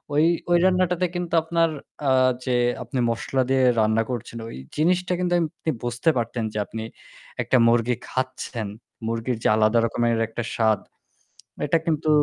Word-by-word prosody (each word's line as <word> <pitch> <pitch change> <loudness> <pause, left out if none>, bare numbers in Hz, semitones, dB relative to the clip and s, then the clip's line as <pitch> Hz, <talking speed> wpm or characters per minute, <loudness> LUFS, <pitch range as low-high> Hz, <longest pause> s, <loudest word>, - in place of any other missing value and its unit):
ওই 150 - +4 0.3
ওই 175 - +6
রান্নাটাতে 180 -1 +2
কিন্তু 175 -1 -3
আপনার 165 0 +2 0.4
আ - - +4 0.3
যে 125 -1 +1 0.3
আপনি 130 - -4
মসলা 130 +3 -1
দিয়ে 135 -1 +3 0.2
রান্না 110 +1 +3
করছেন 120 -1 -5
ওই - - -8 0.2
জিনিসটা 180 +3 +2
কিন্তু 175 -1 0 0.2
আপনি 160 - -3
বুঝতে 120 +6 0
পারতেন 115 0 -2
যে - - -4
আপনি 110 +1 -6 0.6
একটা 130 - +2
মুরগি 120 +1 +3
খাচ্ছেন। 130 -4 -3 0.4
মুরগির 115 +1 -2
যে - - +3
আলাদা 110 +2 +3
রকমের 115 0 +1
একটা 120 +1 -4
স্বাদ 110 -3 +2 0.9
এটা 165 +3 +3
কিন্তু 155 -1 0
125 Hz, 150 wpm, -24 LUFS, 115-165 Hz, 0.9 s, ওই